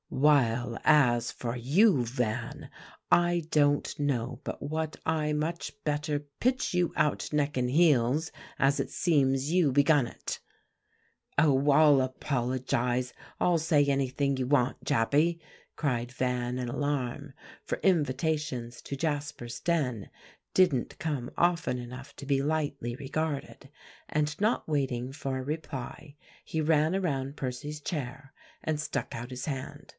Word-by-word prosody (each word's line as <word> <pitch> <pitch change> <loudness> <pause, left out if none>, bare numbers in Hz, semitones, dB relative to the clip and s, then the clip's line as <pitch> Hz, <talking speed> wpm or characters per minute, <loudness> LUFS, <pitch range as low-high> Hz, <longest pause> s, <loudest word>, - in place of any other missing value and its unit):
While 125 -5 +2
as 125 -6 +4
for 120 -1 -4
you, 140 - +3
Van, 120 -1 -3 0.4
I 175 0 +4
don't 145 -1 +2
know 130 -5 -1
but - - -5
what 155 +1 -3
I 155 -1 +1
much 155 +3 -2
better 150 -1 -1 0.2
pitch 255 -2 +1
you 180 -1 +2
out 150 -1 +1
neck 150 -1 0
and 125 -1 0
heels, 150 0 +3 0.3
as 135 +1 +3
it - - -1
seems 140 -2 +1
you 175 -6 +4
begun 145 -1 +4
it." - - -6 1.0
"Oh! 140 -1 +4
I'll 145 -1 +6
apologize; 125 -1 -1 0.3
I'll 175 -2 +3
say 155 -2 +3
anything 140 0 +1
you 130 -1 -1
want, 130 -2 +1
Jappy," 150 +9 +2 0.4
cried 125 -5 -1
Van 125 -1 -1
in 125 -1 -3
alarm; 140 +1 -2 0.3
for - - -3
invitations 150 -6 0
to 140 - -6
Jasper's 145 -5 -3
den 135 - -1 0.4
didn't 155 -10 +2
come 140 -6 -2
often 170 -6 +2
enough 125 +3 -9
to - - -8
be 135 -1 +2
lightly 145 -5 -1
regarded; 140 0 -4 0.4
and 150 0 -1
not 215 +3 +1
waiting 135 -4 -1
for 135 -2 -3
a 130 - -4
reply, 145 -1 -6 0.3
he 160 - -3
ran 155 +2 +3
around 140 -7 -2
Percy's 145 +4 -4
chair, 135 -3 -5 0.3
and 155 -1 -1
stuck 155 - -3
out 120 +2 -6
his 125 -1 -5
hand. 135 -4 -5
140 Hz, 135 wpm, -29 LUFS, 125-155 Hz, 1.0 s, I'll